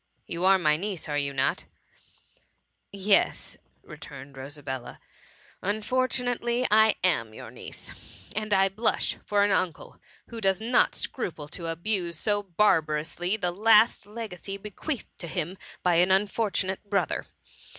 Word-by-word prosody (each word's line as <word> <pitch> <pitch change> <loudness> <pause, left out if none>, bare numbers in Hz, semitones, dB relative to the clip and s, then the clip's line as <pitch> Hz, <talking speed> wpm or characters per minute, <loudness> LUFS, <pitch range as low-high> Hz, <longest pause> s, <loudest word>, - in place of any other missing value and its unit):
" - - -44
You 170 +2 -1
are 190 0 +7
my 150 -4 +3
niece, 190 0 -4
are 145 -1 -1
you 140 -1 -2
hot 135 - 0 0.4
?'* - - -37
" - - -50 0.2
Yes, - - +3 0.3
returned 135 0 -10
Rosabella, 135 -1 -6 0.3
" - - -28
unfortunately 245 +2 0
I 220 0 +6
am 115 -12 +1
your - - -9
niece; - - -8 0.4
and 215 0 -2
I 195 -1 +5
blush 215 +4 0
for 205 -1 +2
an 205 - +3
uncle 185 -4 -1 0.3
who 230 -1 -6
does 195 -1 +2
not 235 +3 +3
scruple 165 - -4
to 170 +1 -6
abuse 170 0 -2
so 205 +4 +1
barbarously 175 -1 +1
the 180 -4 -1
last 215 +2 +4
legacy 205 -3 -6
bequeathed 210 +7 -6
to 170 - -6
him 175 +1 -3 0.3
by 175 -2 +4
an 180 +2 +5
unfortu 200 +2 +2
nate 190 +1 -4
brother. 195 -7 0
190 Hz, 150 wpm, -27 LUFS, 165-215 Hz, 0.4 s, are